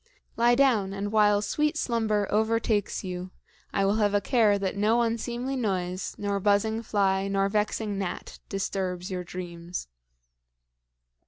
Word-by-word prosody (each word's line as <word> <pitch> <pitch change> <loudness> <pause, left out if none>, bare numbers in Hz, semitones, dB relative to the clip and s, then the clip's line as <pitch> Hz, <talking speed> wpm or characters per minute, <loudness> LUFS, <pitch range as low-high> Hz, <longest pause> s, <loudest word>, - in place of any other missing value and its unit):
Lie 240 +1 +4
down, 235 -8 +3
and 200 +1 -3
while 210 -1 +4
sweet 300 +8 0
slumber 220 -6 +1
overtakes 220 -1 +1
you, 180 -1 -5 0.4
I 195 - +1
will 200 +2 +2
have 205 -2 +2
a - - +5
care 210 -1 +3
that 195 -1 -2
no 220 +4 +3
unseemly 235 +3 -2
noise, 185 -6 -2
nor 200 -1 -1
buzzing 210 +3 +2
fly, 195 -3 +1
nor 195 0 +1
vexing 210 0 -1
gnat 190 -3 -5
disturbs 190 -1 -3
your 180 -1 -3
dreams." 175 - -6
205 Hz, 140 wpm, -27 LUFS, 195-220 Hz, 0.4 s, a